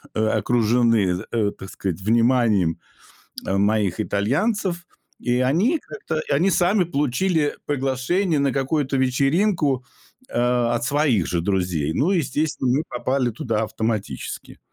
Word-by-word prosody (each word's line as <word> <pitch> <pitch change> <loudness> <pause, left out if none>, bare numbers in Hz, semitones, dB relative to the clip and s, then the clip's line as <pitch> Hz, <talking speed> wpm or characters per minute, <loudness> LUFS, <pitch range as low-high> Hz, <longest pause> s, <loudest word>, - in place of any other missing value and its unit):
э, 110 0 +1
окружены, 115 -4 +2
э, 105 -3 +1
так 95 - -11
сказать, 95 -4 -4
вниманием, 115 -5 +2 0.7
э, 95 - 0
моих 100 -1 +1
итальянцев, 170 - -1 0.3
и 125 0 0
они 180 - +2
как-то 170 -7 -5
и - - -5
они 170 +8 +3
сами 185 +3 +3
получили 150 +2 0
приглашение 145 +5 0
на 140 -1 +1
какую-то 135 0 0
вечеринку, 135 +2 +1 0.4
э, - - -2 0.4
от 120 - -2
своих 135 - +1
же 85 - -1
друзей. 90 -5 -1
Ну 165 +8 +1
и, 190 - +2
естественно, 150 -4 -1
мы - - -2
попали 130 0 0
туда 110 -1 -2
автоматически. 110 - -4
130 Hz, 130 wpm, -22 LUFS, 105-155 Hz, 0.7 s, они